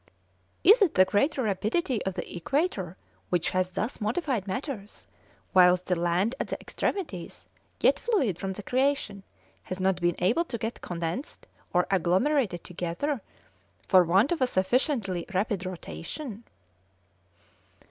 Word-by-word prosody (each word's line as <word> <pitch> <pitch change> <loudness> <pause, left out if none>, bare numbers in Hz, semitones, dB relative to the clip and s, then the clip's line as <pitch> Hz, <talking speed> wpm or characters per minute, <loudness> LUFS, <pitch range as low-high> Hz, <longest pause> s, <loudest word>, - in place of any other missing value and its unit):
Is 430 +4 +7
it 380 -6 +3
the 185 - +7
greater 260 +8 +1
rapidity 215 - 0
of 190 - -2
the - - -5
equator 190 - -1 0.3
which 175 -2 0
has 185 0 +1
thus 220 +6 -3
modified 230 - -1
matters, 210 0 -5 0.5
whilst 180 -1 +6
the 180 - +1
land 175 +6 +1
at - - -2
the - - -4
extremities, 260 - -4 0.4
yet - - +4
fluid 270 - 0
from 195 0 -3
the 205 - -8
creation, 255 -5 0 0.4
has 185 - -6
not 185 -1 +1
been 175 0 +2
able 195 - +2
to 245 - -4
get 225 +1 -4
condensed 175 - -4 0.3
or 180 0 +3
agglomerated 190 - +2
together, 180 - -3 0.7
for 185 -2 +7
want 190 - +3
of 340 - 0
a 255 - +4
sufficiently 195 - 0
rapid 195 -1 0
rotation?" 190 - -7
195 Hz, 135 wpm, -28 LUFS, 180-260 Hz, 0.7 s, Is